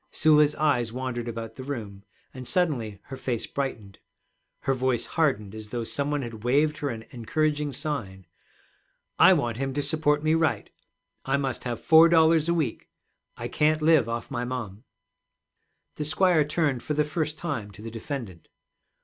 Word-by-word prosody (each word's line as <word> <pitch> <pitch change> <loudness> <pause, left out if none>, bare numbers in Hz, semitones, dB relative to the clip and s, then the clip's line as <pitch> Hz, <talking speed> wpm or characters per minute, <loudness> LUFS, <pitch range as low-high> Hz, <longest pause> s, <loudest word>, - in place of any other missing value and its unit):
Sula's 150 -1 +4
eyes 125 -7 +1
wandered 125 -1 -4
about 115 0 -6
the 130 - -6
room, 110 -8 -6 0.3
and 130 -1 -8
suddenly 125 - 0
her 135 - -8
face 125 -3 -3
brightened. 115 -8 -5 0.6
Her 135 - +1
voice 130 -2 0
hardened 130 -11 0
as 110 -1 -9
though 120 0 -3
some 140 +5 -1
one 145 -2 -1
had 115 -3 -8
waved 150 +5 +2
her 145 - -2
an 115 -3 -5
encouraging 150 +4 -1
sign. 105 - -4 0.9
'I - - +8
want 115 -2 -1
him 135 0 -3
to 145 - +1
support 150 0 +1
me 155 0 +3
right. 160 -2 0 0.5
I 135 +1 +1
must 135 -3 -3
have 120 -2 -3
four 160 +1 +7
dollars 160 -1 +4
a - - +3
week. 150 -9 -2 0.5
I - - -4
can't 155 +1 +1
live 155 -7 +4
off 115 0 -4
my 120 - -2
mom.' 120 -3 -5 1.1
The 150 - -2
squire 155 0 +3
turned 145 -5 0
for 150 - -3
the 150 - +3
first 155 0 -3
time 145 -11 -4
to 105 +2 -13
the 115 - -6
defendant. 115 - -7
135 Hz, 170 wpm, -26 LUFS, 115-150 Hz, 1.1 s, I